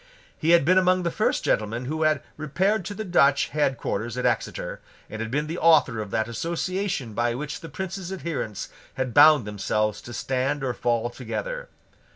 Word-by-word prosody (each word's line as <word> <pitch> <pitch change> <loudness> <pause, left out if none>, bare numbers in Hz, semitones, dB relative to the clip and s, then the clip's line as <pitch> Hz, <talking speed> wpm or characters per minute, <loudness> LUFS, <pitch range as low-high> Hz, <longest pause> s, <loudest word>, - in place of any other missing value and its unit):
He 160 - -2
had 170 -4 +6
been 185 +3 +5
among 185 0 +2
the 170 - 0
first 215 - 0
gentlemen 115 +3 0
who 155 +4 -3
had 155 -1 +2
repaired 185 +7 0
to 205 - -5
the 215 - -4
Dutch 140 -6 +3
head 140 -3 0
quarters 115 +4 -3
at 125 - -1
Exeter, 120 -3 -2 0.3
and 110 - -5
had 115 - -3
been 145 +5 -1
the 165 +3 -4
author 155 -8 +4
of 105 -2 -4
that 110 +1 0
association 170 - -2
by 120 +2 0
which 150 +3 -5
the 165 - -9
Prince's 190 +3 -5
adherents 165 - -4 0.3
had 130 -2 -2
bound 150 -4 +7
themselves 105 +1 -1
to 120 - -10
stand 135 +3 -1
or 130 -2 -1
fall 120 -1 0
together. - - -5
145 Hz, 190 wpm, -25 LUFS, 120-170 Hz, 0.3 s, bound